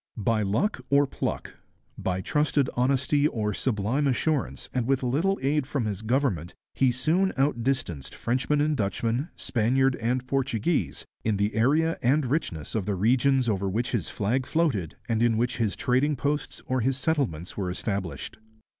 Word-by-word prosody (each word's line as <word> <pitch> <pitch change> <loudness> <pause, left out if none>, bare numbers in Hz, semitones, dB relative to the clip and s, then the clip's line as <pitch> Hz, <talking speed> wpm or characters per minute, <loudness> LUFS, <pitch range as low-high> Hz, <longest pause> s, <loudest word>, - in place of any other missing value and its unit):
By 110 +1 +1
luck 120 - 0
or 140 +1 +5
pluck, - - -4 0.4
by 95 0 -2
trusted 145 +3 +1
honesty 135 +3 +2
or 105 -6 -2
sublime 125 +6 0
assurance, 140 +2 0
and 125 -2 0
with 135 -1 +1
little 160 +11 +1
aid 140 0 +1
from 140 -5 -1
his 105 -2 -3
government, 110 - 0 0.2
he 130 -2 +3
soon 160 +10 +1
outdistanced 125 - -1
Frenchman 130 +5 0
and 150 0 +2
Dutchman, 115 - -1
Spaniard 130 +3 +1
and 125 +3 -1
Portuguese, 135 +3 -1 0.2
in 110 -2 +1
the 100 +1 0
area 150 +9 +2
and 135 +4 +3
richness 120 - -2
of 105 -3 -2
the 100 - 0
regions 125 +6 +3
over 100 -3 0
which 115 +5 -1
his 115 -9 -1
flag 120 +6 -1
floated 135 - 0
and 115 -2 0
in 120 -2 +3
which 120 +2 0
his 110 -4 0
trading 135 +4 +1
posts 145 +2 -2
or 130 -1 0
his 130 +2 +1
settlements 130 - -1
were 95 -3 -2
established. 95 0 -4
125 Hz, 160 wpm, -26 LUFS, 110-140 Hz, 0.4 s, or